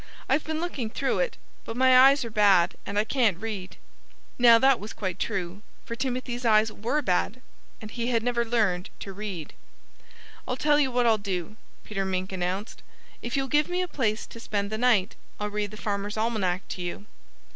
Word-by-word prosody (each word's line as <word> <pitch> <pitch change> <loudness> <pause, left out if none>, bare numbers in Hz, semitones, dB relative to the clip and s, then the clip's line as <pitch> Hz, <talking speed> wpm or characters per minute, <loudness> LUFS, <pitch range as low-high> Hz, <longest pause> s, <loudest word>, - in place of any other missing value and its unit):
"I've 285 +3 +2
been 315 0 -3
looking 295 -9 -3
through 270 +4 -1
it; - - -1 0.3
but 225 - -6
my 260 0 +5
eyes 270 +1 +7
are 230 - -6
bad 200 -5 +4
and 200 - -3
I 210 - +4
can't 225 -5 +1
read." 200 -3 -6 0.6
Now 235 -1 +8
that 265 +1 +4
was 210 +2 -7
quite 185 -4 -4
true; 195 -2 -3 0.2
for 230 - -5
Timothy's 250 -1 -3
eyes 220 -1 +4
were 240 +9 -1
bad 195 +4 0 0.4
and 215 -1 -9
he 235 -1 -3
had 230 -2 +1
never 240 -1 +1
learned 215 -6 0
to 195 - -6
read. 190 -6 -6 0.9
"I'll 250 - -2
tell 295 +1 +3
you 270 -3 +2
what 245 0 +2
I'll 225 -2 +4
do," 190 -1 -4 0.3
Peter 195 -2 -3
Mink 185 0 -2
announced. 185 +3 -3 0.4
"If 235 +3 -3
you'll 270 0 0
give 295 +3 +2
me 360 +1 0
a - - -3
place 225 -9 -1
to 230 - -12
spend 205 -2 -2
the 215 - -3
night 230 -6 +3 0.2
I'll 210 0 -3
read 210 0 -2
the 215 - -10
Farmer's 205 0 -3
Almanac 210 -5 -1
to 185 - -5
you." 175 +3 -5
220 Hz, 195 wpm, -26 LUFS, 200-250 Hz, 0.9 s, Now